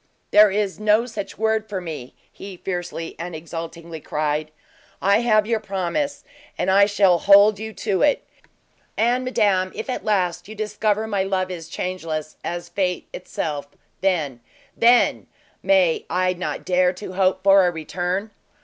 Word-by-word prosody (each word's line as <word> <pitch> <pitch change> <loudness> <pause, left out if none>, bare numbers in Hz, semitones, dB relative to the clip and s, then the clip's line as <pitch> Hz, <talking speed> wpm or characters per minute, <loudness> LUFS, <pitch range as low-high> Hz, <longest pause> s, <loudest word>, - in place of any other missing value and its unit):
"There 210 0 +7
is 200 0 -1
no 215 +2 +3
such 220 -5 -7
word 220 0 0
for 195 -3 -3
me!" 155 -8 -7 0.2
he 195 -2 -10
fiercely 175 -3 -5
and 170 0 -5
exultingly 165 0 -7
cried. 150 +1 -2 0.5
"I 200 +2 +3
have 215 -3 +3
your 225 0 0
promise, 205 - -2 0.3
and - - +1
I 200 +1 +6
shall 195 -4 +3
hold 200 +2 +6
you 220 0 -5
to 200 -3 -1
it! 290 0 +2 0.7
And, 240 +3 +2
madame, 195 -7 +1
if, 220 +4 -4
at - - -4
last, 185 -6 0
you 215 - -9
discover 215 0 -1
my 205 -3 -1
love 190 -1 -1
is 165 -3 -7
changeless 160 -4 -4
as 175 0 -4
fate 180 -3 -2
itself, 150 -5 -4 0.3
then 155 -10 0 0.4
then 240 +1 +4 0.3
may 190 -4 +3
I 185 +1 +1
not 180 0 -5
dare 180 0 +2
to 185 0 -8
hope 190 0 +1
for 195 -1 +6
a - - +1
return?" 180 +5 -3
190 Hz, 155 wpm, -22 LUFS, 175-210 Hz, 0.7 s, There